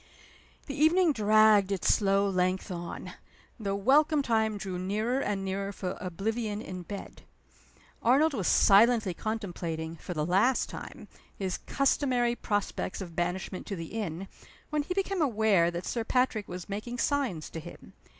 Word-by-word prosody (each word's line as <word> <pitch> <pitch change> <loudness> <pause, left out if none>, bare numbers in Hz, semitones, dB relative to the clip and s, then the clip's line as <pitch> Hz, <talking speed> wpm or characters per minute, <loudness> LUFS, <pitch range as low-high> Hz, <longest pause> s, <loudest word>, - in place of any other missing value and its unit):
The 280 - -5
evening 320 +3 +4
dragged 215 -3 +5
its 195 -3 +2
slow 200 -1 +2
length 185 +1 0
on; 175 -1 -6 0.5
the 200 -2 -2
welcome 290 +8 +3
time 220 -3 +1
drew 190 -3 -5
nearer 215 +7 -1
and 200 -6 -2
nearer 195 +1 -2
for 185 -2 -4
oblivion 210 +4 -3
in 185 -4 -7
bed. 200 +3 -8 0.8
Arnold 285 +6 +4
was 200 -9 -1
silently 215 -1 +5
contemplating, 170 -6 -4
for 180 - -7
the 150 -1 0
last 195 +9 +2
time, - - -9 0.3
his 190 -2 -3
customary 255 -3 +1
prospects 205 -4 -2
of 175 -4 -7
banishment 180 +2 -3
to 200 - -3
the 165 -2 -7
inn, 195 -4 -4 0.4
when 300 -1 +1
he 360 +5 -4
became 390 -2 -1
aware 215 - +3
that 175 +1 -5
Sir 235 - -2
Patrick 250 -3 0
was 180 0 -7
making 215 +5 -5
signs 250 - -1
to 165 - -5
him. - - -12
205 Hz, 150 wpm, -29 LUFS, 185-240 Hz, 0.8 s, dragged